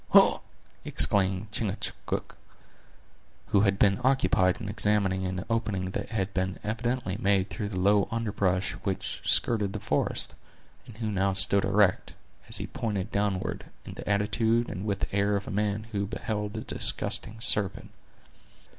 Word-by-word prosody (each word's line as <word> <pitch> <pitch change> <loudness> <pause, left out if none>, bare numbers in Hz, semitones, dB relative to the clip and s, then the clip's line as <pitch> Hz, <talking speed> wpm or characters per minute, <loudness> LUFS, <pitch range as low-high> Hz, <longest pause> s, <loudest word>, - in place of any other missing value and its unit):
"Hugh!" - - +7 0.4
exclaimed 100 +1 +2
Chingachgook, 110 -2 -3 1.1
who 100 - +4
had 100 -2 +2
been 100 +4 +3
occupied 95 -8 +3
in 110 - -6
examining 100 -2 0
an 95 0 -4
opening 105 -5 -1
that - - -4
had 95 -3 -2
been 95 0 -1
evidently 115 -1 -2
made 100 -3 +1
through 100 +3 -3
the 95 -3 -3
low 100 +1 +3
underbrush 100 -5 0
which 95 -1 -3
skirted 105 -4 +2
the - - -3
forest; - - -1 0.5
and 110 - -12
who 110 -2 -2
now 95 0 +1
stood 100 +1 +5
erect, 100 -2 +2 0.3
as - - +1
he - - -4
pointed 105 -5 -3
downward, 100 -2 -1 0.2
in - - -8
the - - -7
attitude 110 +3 +1
and 95 +4 -5
with 100 -2 -1
the - - -3
air 100 +1 +2
of 100 0 -3
a - - -4
man 105 +1 -1
who 100 -2 -1
beheld 105 0 -4
a - - -3
disgusting 110 +1 0
serpent. 105 -4 0
100 Hz, 155 wpm, -28 LUFS, 95-110 Hz, 1.1 s, Hugh